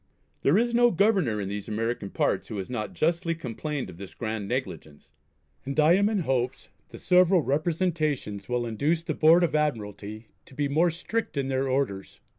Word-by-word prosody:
There 150 +7 +4
is 235 +1 +1
no 240 0 +5
Governor 190 - +2
in 100 - -3
these 100 +1 -5
American 110 -1 -2
parts - - 0
who 105 - -6
has 95 +4 -5
not 110 -4 -4
justly 165 +1 0
complained 150 -1 -4
of 90 -2 -11
this 100 0 -10
grand 110 -3 -4
negligence; 110 - -5 0.5
and 140 +3 -3
I 155 +2 +6
am 200 +3 +3
in 210 -4 0
hopes 130 -2 -2 0.2
the - - -10
several 180 -1 +4
representations 155 - -1
will 125 -1 0
induce 145 +9 0
the 165 -2 -2
Board 165 +4 +5
of 170 - +1
Admiralty 110 -7 -3 0.2
to 130 - -15
be 145 +1 0
more 160 +5 +3
strict 175 +2 -3
in 135 -1 -1
their 135 0 0
orders. 130 -8 -2
140 Hz, 185 wpm, -27 LUFS, 110-170 Hz, 0.5 s, I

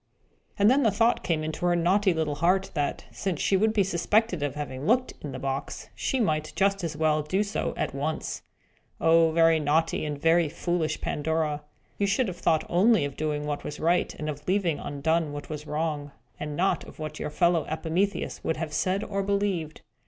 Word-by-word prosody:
And 200 - +4
then 265 +5 +5
the 230 - +4
thought 230 +4 +2
came 160 -3 0
into 155 +2 -4
her 175 - +3
naughty 190 +4 +3
little 160 -3 -1
heart, 180 +6 +1
that, 145 -3 -2
since 185 -6 -3
she 195 - +2
would 215 +3 +3
be 210 -2 +3
suspected 190 +1 +1
of 145 -1 -2
having 145 -1 -5
looked 250 +3 +3
into 145 -3 -6
the - - -4
box, 135 +1 -4
she 265 - -1
might 155 -8 0
just 195 -1 +1
as 160 -3 -3
well 155 -1 +2
do 185 +7 0
so 205 0 -3
at - - -2
once. 150 +3 -3 0.6
Oh, 165 0 +5
very 165 0 +4
naughty 155 +3 +1
and 150 -2 -3
very 165 +1 +3
foolish 175 0 -2
Pandora! 155 -1 -1 0.4
You 200 - +2
should 220 +5 +1
have 180 - -7
thought 160 -3 +1
only 200 0 +4
of 140 -2 -5
doing 150 -1 -2
what 145 -1 -3
was 150 - -6
right, 170 +3 +2
and 155 - -5
of 150 0 -6
leaving 180 -5 +1
undone 150 +2 -1
what 145 0 -7
was 150 0 -6
wrong, 150 -1 -2 0.3
and 150 -1 -4
not 185 +5 +1
of - - -13
what 155 -1 -6
your - - -3
playfellow 170 +1 +2
Epimetheus 170 +5 -1
would 160 - -1
have 155 -1 -4
said 190 +5 0
or 200 -1 -2
believed. 195 -5 -1
165 Hz, 200 wpm, -27 LUFS, 150-195 Hz, 0.6 s, then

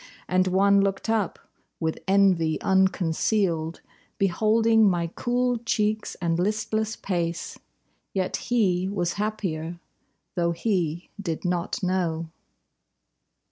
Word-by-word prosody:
And 185 0 +2
one 200 +2 +4
looked 195 +2 -1
up, 215 -5 0 0.4
with 160 0 -2
envy 190 -5 +3
unconcealed, 185 -2 +1 0.4
Beholding 220 +3 +4
my 175 -2 0
cool 245 0 0
cheeks 215 -2 -1
and 170 -2 -1
listless 215 +3 -1
pace, 170 -3 -3 0.5
Yet 185 -2 -1
he 190 -6 +2
was 180 -4 -1
happier, 175 -6 -3 0.5
though 170 -1 +1
he 170 -3 -1
did 170 -2 -4
not 175 +2 -1
know. 170 -3 -1
190 Hz, 100 wpm, -25 LUFS, 170-215 Hz, 0.5 s, one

